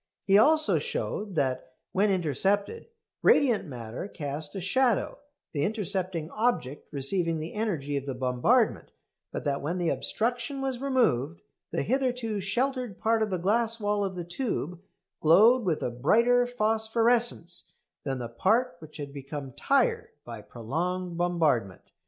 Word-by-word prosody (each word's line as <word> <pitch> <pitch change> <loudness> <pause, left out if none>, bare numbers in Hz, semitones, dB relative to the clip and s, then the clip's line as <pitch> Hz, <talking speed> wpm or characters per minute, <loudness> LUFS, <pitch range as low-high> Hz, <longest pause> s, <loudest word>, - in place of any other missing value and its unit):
He 195 - +4
also 305 +8 +5
showed 215 - -4
that, 130 -3 -1 0.2
when 205 +2 +2
intercepted, 195 - 0 0.3
radiant 240 - +4
matter 120 - -6
cast 145 -3 -5
a - - -2
shadow, 230 +5 +1 0.3
the 145 - -1
intercepting 190 -5 -2
object 215 - -1
receiving 165 +4 0
the 155 +2 -6
energy 170 -10 -2
of 140 0 -5
the 135 - -3
bombardment; 125 -1 +1 0.4
but - - -4
that 140 -1 -1
when 165 +6 -2
the 175 -2 0
obstruction 245 +4 -1
was 265 -2 -3
removed 195 - +1 0.3
the - - -1
hitherto 250 -4 -1
sheltered 245 +2 -1
part 225 0 +1
of 215 - +1
the 185 - -1
glass 225 +5 +1
wall 205 -1 0
of 190 -1 -3
the 175 -1 -5
tube 175 - -3 0.4
glowed 220 +9 +6
with 165 -5 0
a 125 - -1
brighter 235 - +3
phosphorescence 225 -3 0 0.3
than 135 -2 -2
the 120 -2 -4
part 190 - +1
which 155 -1 -12
had 140 -2 -7
become 140 -1 -7
"tired" 275 - +1 0.2
by 115 -2 -8
prolonged 170 - -3
bombardment. 160 - 0
185 Hz, 145 wpm, -28 LUFS, 145-230 Hz, 0.4 s, glowed